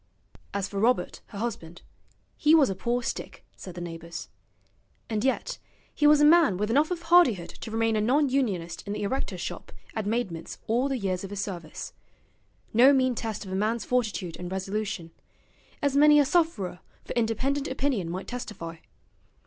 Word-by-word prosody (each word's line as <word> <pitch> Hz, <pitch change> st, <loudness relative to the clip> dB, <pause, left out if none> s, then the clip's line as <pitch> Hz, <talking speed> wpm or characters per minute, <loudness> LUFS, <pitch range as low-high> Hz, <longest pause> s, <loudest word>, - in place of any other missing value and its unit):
As 200 Hz, -1 st, -2 dB
for 200 Hz, -, -4 dB
Robert 240 Hz, +4 st, +1 dB
her 205 Hz, -, -10 dB
husband, 195 Hz, -7 st, -5 dB, 0.5 s
he 310 Hz, +1 st, +5 dB
was 280 Hz, -9 st, +5 dB
a -, -, -3 dB
poor 240 Hz, +5 st, -1 dB
stick, -, -, -5 dB
said 185 Hz, -2 st, -9 dB
the 175 Hz, -, -6 dB
neighbours. 170 Hz, -1 st, -7 dB, 0.8 s
And 215 Hz, 0 st, 0 dB
yet 265 Hz, 0 st, -1 dB, 0.3 s
he 295 Hz, -, +3 dB
was 300 Hz, 0 st, +7 dB
a 295 Hz, -, +6 dB
man 310 Hz, -, +6 dB
with 210 Hz, +3 st, -1 dB
enough 290 Hz, +5 st, +3 dB
of 350 Hz, -2 st, -3 dB
hardihood 325 Hz, -, +4 dB
to 230 Hz, -, -9 dB
remain 225 Hz, 0 st, +1 dB
a 215 Hz, -, +2 dB
non 275 Hz, +7 st, +3 dB
unionist 200 Hz, -11 st, -1 dB
in 200 Hz, -, -2 dB
the 210 Hz, -, -3 dB
erectors' 260 Hz, +7 st, -2 dB
shop -, -, -6 dB, 0.2 s
at 220 Hz, -2 st, -3 dB
Maidment's 205 Hz, -8 st, -2 dB
all 245 Hz, +5 st, +1 dB
the 270 Hz, -, 0 dB
years 190 Hz, -4 st, -2 dB
of 195 Hz, -, -6 dB
his 200 Hz, -1 st, -3 dB
service; 170 Hz, -6 st, -6 dB, 0.8 s
no 255 Hz, +5 st, +7 dB
mean 255 Hz, -2 st, +3 dB
test 220 Hz, -3 st, -4 dB
of 190 Hz, -, -8 dB
a -, -, -2 dB
man's 215 Hz, +4 st, 0 dB
fortitude 215 Hz, -8 st, -1 dB
and 180 Hz, 0 st, -6 dB
resolution, 190 Hz, -2 st, -3 dB, 0.7 s
as 285 Hz, -1 st, +2 dB
many 295 Hz, +1 st, +7 dB
a 290 Hz, -, +5 dB
sufferer 265 Hz, -, 0 dB, 0.3 s
for -, -, -5 dB
independent 260 Hz, +5 st, 0 dB
opinion 260 Hz, -9 st, -1 dB
might 185 Hz, +3 st, -5 dB
testify. 210 Hz, -9 st, -6 dB
225 Hz, 180 wpm, -27 LUFS, 190-270 Hz, 0.8 s, was